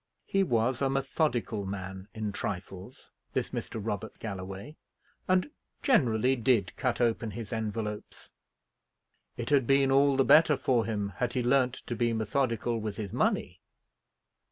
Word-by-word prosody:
He 195 Hz, -, +1 dB
was 120 Hz, -6 st, +1 dB
a 135 Hz, -, +2 dB
methodical 135 Hz, -, 0 dB
man 95 Hz, 0 st, -6 dB
in 110 Hz, -1 st, -2 dB
trifles, 95 Hz, +3 st, -6 dB, 0.2 s
this -, -, -1 dB
Mr. 115 Hz, -, -4 dB
Robert 105 Hz, 0 st, -4 dB
Galloway, 100 Hz, +5 st, -6 dB, 0.5 s
and 185 Hz, +9 st, +2 dB, 0.3 s
generally 130 Hz, -, +3 dB
did 120 Hz, -3 st, +1 dB
cut 125 Hz, -2 st, -1 dB
open 115 Hz, -1 st, +1 dB
his 115 Hz, +1 st, -6 dB
envelopes. 110 Hz, -1 st, -4 dB, 1.1 s
It -, -, -4 dB
had 135 Hz, -5 st, +4 dB
been 135 Hz, 0 st, +4 dB
all 140 Hz, 0 st, +4 dB
the 135 Hz, -, +4 dB
better 150 Hz, 0 st, +6 dB
for 120 Hz, -3 st, +1 dB
him 105 Hz, -3 st, -2 dB
had 125 Hz, -1 st, -1 dB
he 125 Hz, -, 0 dB
learnt 130 Hz, 0 st, +3 dB
to 120 Hz, -, -3 dB
be 120 Hz, 0 st, +1 dB
methodical 115 Hz, 0 st, 0 dB
with 105 Hz, -2 st, -4 dB
his 105 Hz, -4 st, -5 dB
money. -, -, 0 dB
115 Hz, 145 wpm, -29 LUFS, 105-135 Hz, 1.1 s, better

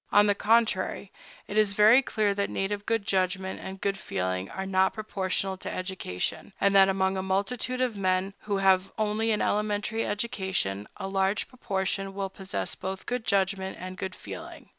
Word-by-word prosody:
On 205 Hz, 0 st, +6 dB
the 205 Hz, -, +4 dB
contrary, 205 Hz, -2 st, +1 dB, 0.4 s
it 210 Hz, -, +1 dB
is 210 Hz, -2 st, +3 dB
very 215 Hz, +6 st, +7 dB
clear 215 Hz, -5 st, +1 dB
that 200 Hz, 0 st, -1 dB
native 205 Hz, +1 st, -2 dB
good 225 Hz, -3 st, +1 dB
judgment 190 Hz, -1 st, 0 dB
and 190 Hz, 0 st, -7 dB
good 195 Hz, 0 st, -1 dB
feeling 95 Hz, -, -2 dB
are 190 Hz, -, -4 dB
not 190 Hz, 0 st, +2 dB
proportional 195 Hz, -3 st, -1 dB
to -, -, -6 dB
education, 185 Hz, -, -4 dB
and 200 Hz, 0 st, +3 dB
that 195 Hz, 0 st, +7 dB
among 190 Hz, 0 st, +1 dB
a -, -, 0 dB
multitude 205 Hz, +7 st, -1 dB
of 250 Hz, -4 st, +1 dB
men 190 Hz, 0 st, 0 dB
who 205 Hz, -2 st, -2 dB
have 190 Hz, -1 st, +3 dB
only 215 Hz, +1 st, 0 dB
an 215 Hz, -1 st, +2 dB
elementary 210 Hz, +2 st, 0 dB
education, 190 Hz, -, -2 dB
a 195 Hz, -, -4 dB
large 195 Hz, +1 st, +1 dB
proportion 195 Hz, -5 st, -2 dB
will 195 Hz, -1 st, -3 dB
possess 190 Hz, 0 st, -4 dB
both 190 Hz, 0 st, -5 dB
good 245 Hz, -2 st, -2 dB
judgment 190 Hz, -1 st, 0 dB
and 185 Hz, +1 st, -6 dB
good 190 Hz, 0 st, -5 dB
feeling. -, -, -9 dB
195 Hz, 175 wpm, -28 LUFS, 190-210 Hz, 0.4 s, very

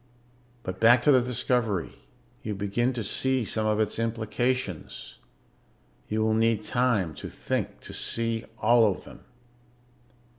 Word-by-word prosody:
"But 95 Hz, 0 st, -5 dB
back 120 Hz, +2 st, +6 dB
to 145 Hz, -, +6 dB
the 130 Hz, -2 st, +6 dB
discovery. 120 Hz, -6 st, 0 dB, 0.5 s
You 105 Hz, -1 st, -4 dB
begin 100 Hz, +5 st, 0 dB
to 120 Hz, -2 st, -3 dB
see 130 Hz, +5 st, 0 dB
some 110 Hz, 0 st, -1 dB
of 105 Hz, 0 st, +1 dB
its 110 Hz, +1 st, 0 dB
implications. 115 Hz, -2 st, -2 dB, 0.9 s
You 110 Hz, +1 st, 0 dB
will 110 Hz, 0 st, +2 dB
need 110 Hz, -1 st, +2 dB
time 110 Hz, -9 st, +1 dB
to -, -, -7 dB
think -, -, -3 dB
to -, -, -8 dB
see 115 Hz, -1 st, -2 dB
all 110 Hz, 0 st, +5 dB
of -, -, -7 dB
them. -, -, -13 dB
115 Hz, 140 wpm, -27 LUFS, 105-120 Hz, 0.9 s, back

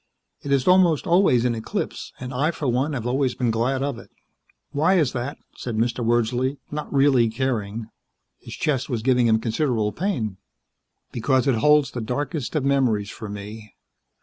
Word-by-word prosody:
It 140 Hz, -, -5 dB
is 135 Hz, -2 st, +2 dB
almost 180 Hz, -4 st, +4 dB
always 170 Hz, -9 st, +4 dB
in 125 Hz, -, +2 dB
eclipse, 110 Hz, -1 st, -4 dB
and 125 Hz, +1 st, -6 dB
I, 140 Hz, +5 st, +1 dB
for 160 Hz, -4 st, -3 dB
one, 130 Hz, +5 st, 0 dB
have 120 Hz, -4 st, -4 dB
always 130 Hz, 0 st, 0 dB
been 120 Hz, -3 st, 0 dB
glad 130 Hz, +4 st, 0 dB
of 140 Hz, -4 st, -3 dB
it." -, -, -14 dB, 0.6 s
"Why 160 Hz, +7 st, +2 dB
is 155 Hz, -8 st, +2 dB
that?" 130 Hz, +3 st, -4 dB, 0.2 s
said 120 Hz, -3 st, -5 dB
Mr. 120 Hz, +2 st, 0 dB
Wordsley, 120 Hz, +4 st, +1 dB
not 150 Hz, 0 st, -5 dB
really 135 Hz, -4 st, +4 dB
caring. 115 Hz, -3 st, -2 dB, 0.5 s
His -, -, -9 dB
chest 135 Hz, -3 st, -1 dB
was 115 Hz, -4 st, -2 dB
giving 125 Hz, -2 st, +3 dB
him 110 Hz, -1 st, +3 dB
considerable 115 Hz, -2 st, 0 dB
pain. 125 Hz, -, -2 dB, 0.7 s
"Because 130 Hz, +2 st, +1 dB
it 135 Hz, -, +4 dB
holds 150 Hz, +3 st, +4 dB
the 120 Hz, -, -4 dB
darkest 145 Hz, +5 st, -3 dB
of 145 Hz, -3 st, 0 dB
memories 125 Hz, -7 st, +1 dB
for 110 Hz, -, -8 dB
me. 105 Hz, +1 st, -9 dB
125 Hz, 175 wpm, -23 LUFS, 115-145 Hz, 0.7 s, almost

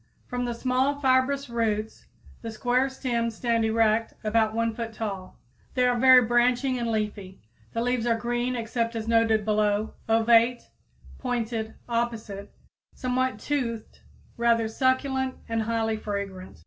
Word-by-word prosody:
_ -, -, -35 dB, 0.2 s
From 245 Hz, 0 st, -2 dB
the 240 Hz, -1 st, -3 dB
small, 260 Hz, +4 st, 0 dB
fibrous 270 Hz, +1 st, +2 dB
roots 225 Hz, -2 st, -2 dB, 0.3 s
the 230 Hz, -, -5 dB
square 245 Hz, +4 st, +1 dB
stems 235 Hz, -4 st, -2 dB
stand 230 Hz, -1 st, 0 dB
erect 220 Hz, 0 st, +1 dB
about 220 Hz, 0 st, +1 dB
1 230 Hz, 0 st, 0 dB
foot 230 Hz, 0 st, -5 dB
tall. 200 Hz, -4 st, -5 dB, 0.4 s
They 250 Hz, -1 st, +3 dB
are 245 Hz, 0 st, +3 dB
very 255 Hz, +1 st, +7 dB
branching 245 Hz, +2 st, +2 dB
and 235 Hz, -1 st, -2 dB
leafy. 210 Hz, -3 st, -3 dB, 0.3 s
The 230 Hz, -, -1 dB
leaves 245 Hz, -1 st, 0 dB
are 230 Hz, -1 st, +2 dB
green, 240 Hz, +2 st, -1 dB
except 230 Hz, 0 st, -2 dB
as 225 Hz, -1 st, -4 dB
noted 225 Hz, -2 st, +3 dB
below, 210 Hz, 0 st, +1 dB, 0.2 s
ovate, 230 Hz, +2 st, +3 dB, 0.5 s
pointed, 230 Hz, -3 st, -3 dB
opposite, 230 Hz, -4 st, -3 dB, 0.4 s
somewhat 255 Hz, -2 st, -1 dB
toothed, 230 Hz, -3 st, -3 dB, 0.4 s
rather 235 Hz, -1 st, +2 dB
succulent 260 Hz, +2 st, 0 dB
and 225 Hz, 0 st, -1 dB
highly 225 Hz, 0 st, -1 dB
fragrant. 200 Hz, -, -6 dB
230 Hz, 140 wpm, -26 LUFS, 220-250 Hz, 0.5 s, very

